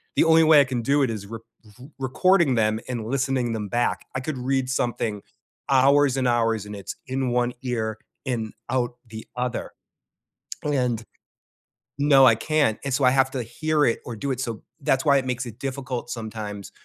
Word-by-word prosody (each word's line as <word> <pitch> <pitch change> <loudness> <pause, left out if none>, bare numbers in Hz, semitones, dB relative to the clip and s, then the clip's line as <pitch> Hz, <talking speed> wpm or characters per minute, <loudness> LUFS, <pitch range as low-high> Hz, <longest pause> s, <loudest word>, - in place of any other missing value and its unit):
the - - +5
only 165 0 +5
way 155 -1 +7
I - - +5
can 130 -3 -3
do 140 +4 +2
it - - -3
is 105 -3 -6
r 115 - -4 0.3
r 110 +5 -15
recording 150 +3 +3
them 110 -1 +1
and 120 -3 -3
listening 130 -1 0
them 105 -2 -3
back. 120 +4 -1
I - - 0
could 140 +1 -4
read 130 +1 0
something 115 -5 -1 0.5
hours 135 0 +4
and 130 -1 +1
hours, 115 -3 +1
and 105 0 -7
it's 100 - -7
in 130 0 -1
one 120 0 +1
ear 110 -4 -2 0.3
and 115 -4 -2 0.2
out 120 -1 0
the 110 0 -9
other. 125 -1 -2 0.9
And 125 -6 0 1.0
no, 140 -2 +6
I 115 - +6
can't. 145 -3 +1
And 140 - -1
so, 135 - +1
I 125 - +7
have 135 0 +3
to 130 - -3
hear 150 +6 0
it 115 - +1
or 120 - -6
do 140 +6 -4
it. 130 - -3
So, 115 -4 -4 0.2
that's 135 -1 +1
why 140 -2 +5
it 135 - -1
makes 125 0 -2
it 115 -1 -9
difficult 130 -3 -4
sometimes 110 -3 -6
125 Hz, 190 wpm, -24 LUFS, 115-135 Hz, 1.0 s, way